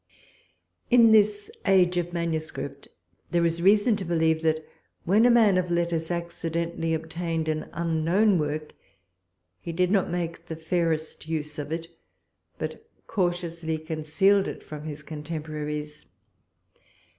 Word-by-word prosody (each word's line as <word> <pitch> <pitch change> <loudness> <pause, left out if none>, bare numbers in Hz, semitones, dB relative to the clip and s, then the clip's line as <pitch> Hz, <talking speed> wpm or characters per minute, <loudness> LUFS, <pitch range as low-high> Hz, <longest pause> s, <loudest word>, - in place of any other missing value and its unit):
In 235 -2 +7
this 205 -1 +3 0.2
age 185 -2 +4
of 175 0 -1
manuscript, 160 -4 -3 0.4
there 170 -1 +2
is 165 0 0
reason 210 +4 +5
to 200 - -4
believe, 160 -2 +1
that 160 -1 0 0.4
when 210 +7 +4
a - - +5
man 220 -6 +5
of 180 -1 -2
letters 170 -1 0
accidentally 170 -1 -2
obtained 160 0 -3
an 155 0 -2
unknown 170 +4 +2
work, 150 0 -3 0.9
he 170 - -6
did 180 +2 +1
not 195 -3 +2
make 170 -1 -4
the 160 - -5
fairest 160 -1 -2
use 150 -1 -3
of 145 +1 -5
it, 165 0 -3 0.7
but - - -5 0.2
cautiously 175 -4 -1
concealed 160 +6 +2
it - - -6
from 150 0 -8
his 150 -1 -6
contemporaries. 150 -1 -5
165 Hz, 130 wpm, -26 LUFS, 155-180 Hz, 0.9 s, In